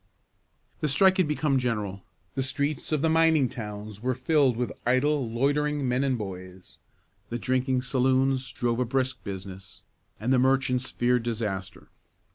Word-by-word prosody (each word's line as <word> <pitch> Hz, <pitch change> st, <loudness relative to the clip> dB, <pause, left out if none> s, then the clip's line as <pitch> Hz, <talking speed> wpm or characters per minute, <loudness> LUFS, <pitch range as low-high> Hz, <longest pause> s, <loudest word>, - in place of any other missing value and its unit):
The 155 Hz, -, 0 dB
strike 190 Hz, +7 st, +4 dB
had 185 Hz, -4 st, +3 dB
become 145 Hz, -2 st, +1 dB
general. 105 Hz, -6 st, -2 dB, 0.3 s
The 135 Hz, -, -1 dB
streets 140 Hz, +3 st, -2 dB
of 155 Hz, -1 st, +1 dB
the -, -, +4 dB
mining 160 Hz, -4 st, +4 dB
towns 105 Hz, -2 st, -7 dB
were 130 Hz, +1 st, 0 dB
filled 135 Hz, -2 st, +2 dB
with 120 Hz, -3 st, -1 dB
idle, 130 Hz, +1 st, +1 dB
loitering 145 Hz, +3 st, 0 dB
men 125 Hz, +2 st, +1 dB
and 135 Hz, -2 st, +1 dB
boys. 95 Hz, -3 st, -9 dB, 0.5 s
The 120 Hz, -, -2 dB
drinking 130 Hz, 0 st, 0 dB
saloons 130 Hz, 0 st, +1 dB
drove 120 Hz, -2 st, -1 dB
a 125 Hz, -, +2 dB
brisk 130 Hz, 0 st, -1 dB
business, 95 Hz, -1 st, -8 dB, 0.4 s
and 120 Hz, +5 st, +1 dB
the 130 Hz, -, +4 dB
merchants 130 Hz, 0 st, +2 dB
feared 125 Hz, 0 st, +1 dB
disaster. 100 Hz, -5 st, -4 dB
125 Hz, 150 wpm, -27 LUFS, 115-135 Hz, 0.5 s, strike